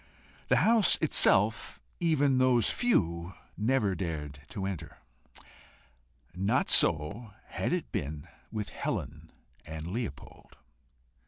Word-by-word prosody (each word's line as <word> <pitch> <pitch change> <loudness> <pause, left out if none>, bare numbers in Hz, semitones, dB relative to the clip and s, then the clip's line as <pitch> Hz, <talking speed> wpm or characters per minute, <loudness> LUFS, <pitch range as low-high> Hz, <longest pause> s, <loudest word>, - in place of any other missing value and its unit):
The - - +3
house 225 -3 +5
itself 110 -7 +3 0.2
even 145 -6 +2
those 125 -3 +3
few 85 - 0 0.2
never 110 -2 0
dared 75 -6 -5
to 95 - -5
enter. 95 -5 -6 1.4
Not 95 +4 0
so 95 +8 +3
had - - -3
it - - -3
been 75 +2 -5 0.2
with 105 -2 -4
Helen - - -5 0.3
and 80 0 -8
Leopold. 105 - -7
100 Hz, 100 wpm, -29 LUFS, 85-130 Hz, 1.4 s, house